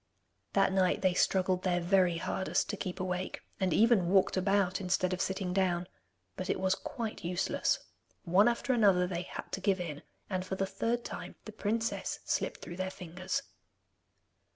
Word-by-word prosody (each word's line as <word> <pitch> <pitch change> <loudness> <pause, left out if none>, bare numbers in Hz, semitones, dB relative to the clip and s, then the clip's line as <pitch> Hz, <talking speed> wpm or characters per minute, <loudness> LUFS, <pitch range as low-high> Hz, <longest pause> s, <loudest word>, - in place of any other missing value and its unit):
That - - +3
night 190 0 +2
they 185 -1 +4
struggled 185 0 +2
their 180 -1 +1
very 175 -1 +3
hardest 190 +3 -1
to - - -3
keep 185 -1 -5
awake, 185 0 -3 0.2
and 190 -2 +1
even 215 -2 +4
walked 190 0 +4
about 195 0 +2
instead 185 0 +1
of 185 - -2
sitting 190 -1 -1
down. 180 -2 +1 0.5
But 185 - -5
it - - 0
was 190 0 +2
quite 230 0 -5
useless. 175 +1 +1 0.5
One 190 +5 +5
after 240 +2 +1
another 195 -6 +4
they 180 -1 -3
had 180 - -7
to 195 - -3
give 195 -1 +2
in, 155 -5 -5 0.3
and 185 -2 -2
for 190 +1 -4
the 195 - 0
third 235 +5 -1
time - - -6
the 215 - -7
princess 225 +2 -1
slipped - - -1
through 175 - -7
their 185 0 -1
fingers. 185 +9 -4
185 Hz, 175 wpm, -31 LUFS, 180-200 Hz, 0.5 s, One